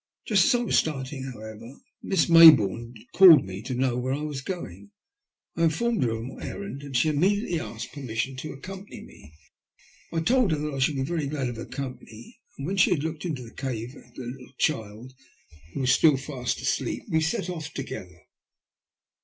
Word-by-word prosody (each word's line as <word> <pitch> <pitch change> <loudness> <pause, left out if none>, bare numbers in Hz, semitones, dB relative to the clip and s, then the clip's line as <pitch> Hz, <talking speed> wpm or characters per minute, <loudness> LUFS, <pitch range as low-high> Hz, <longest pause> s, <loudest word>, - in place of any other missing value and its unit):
Just 195 -5 +4
as - - +4
I - - -1
was 230 - +3
starting, 135 -3 -4
however, 110 +2 -10 0.3
Miss 190 -5 +1
Mayboume 125 - +7 0.2
called 180 -5 +9
to - - -9
me 95 +1 -7
to 125 +3 -4
know 125 -1 0
where 130 +2 -1
I 150 - -5
was 150 -3 -4
going. 100 - -7 0.7
I 165 - +2
informed 225 +9 0
her 120 - +2
of 115 0 -3
my 130 - -9
errand, 200 -8 -6
and 140 -3 -3
she 140 +6 +3
inmiediately 180 +3 +1
asked - - -7
per 145 - -8
mission 125 +1 -3
to 155 - -6
accompany 190 +8 -9
me. 75 - -16 0.8
I 165 - -1
told 235 0 +3
her - - 0
that 150 0 -3
I 135 - -4
should 140 +3 +2
be 135 - -1
very 155 0 -2
glad 140 -3 -2
of 120 - -7
her 115 - -7
company, 125 -4 -8 0.2
and 140 - -5
when 195 +5 -2
she 185 - +5
had 165 -6 0
looked 160 +1 -4
into 145 -7 -3
the 115 - -13
cave 125 -1 -5
at 125 -3 -17
the 130 - -7
little 125 +2 -9
child, 115 -3 -2 0.6
who - - -2
was 130 -1 +3
still 155 -4 +5
fast 130 -2 -4
asleep, - - -2
we 160 - +1
set 160 +2 -1
off 160 -4 -5
together. 90 -10 -8
140 Hz, 205 wpm, -26 LUFS, 125-160 Hz, 0.8 s, called